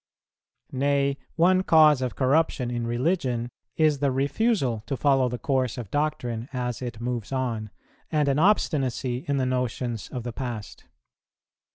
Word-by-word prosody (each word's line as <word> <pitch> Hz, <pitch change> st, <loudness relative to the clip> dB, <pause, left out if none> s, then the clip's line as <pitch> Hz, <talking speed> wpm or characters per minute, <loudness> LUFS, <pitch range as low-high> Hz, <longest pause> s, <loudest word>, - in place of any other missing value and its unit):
Nay, 140 Hz, +1 st, +1 dB, 0.2 s
one 185 Hz, +3 st, +4 dB
cause 155 Hz, -6 st, +5 dB
of 130 Hz, -1 st, -2 dB
corruption 135 Hz, -2 st, +1 dB
in 120 Hz, -1 st, -2 dB
religion 120 Hz, -2 st, 0 dB, 0.3 s
is 155 Hz, -3 st, +3 dB
the 140 Hz, 0 st, +2 dB
refusal 140 Hz, -, 0 dB
to 135 Hz, -, -2 dB
follow 135 Hz, -3 st, +3 dB
the 125 Hz, -, -4 dB
course 130 Hz, -2 st, -1 dB
of 115 Hz, -6 st, -7 dB
doctrine 125 Hz, -6 st, -2 dB
as 125 Hz, -2 st, -3 dB
it 120 Hz, -3 st, -5 dB
moves 120 Hz, -2 st, -3 dB
on, 120 Hz, -5 st, -2 dB, 0.4 s
and 150 Hz, -2 st, +2 dB
an 140 Hz, +1 st, +2 dB
obstinacy 135 Hz, -, +1 dB
in 140 Hz, -1 st, +1 dB
the 130 Hz, -, +1 dB
notions 125 Hz, -3 st, -2 dB
of 125 Hz, -, -5 dB
the 120 Hz, -1 st, -5 dB
past. 120 Hz, -5 st, -6 dB
130 Hz, 150 wpm, -26 LUFS, 120-145 Hz, 0.4 s, cause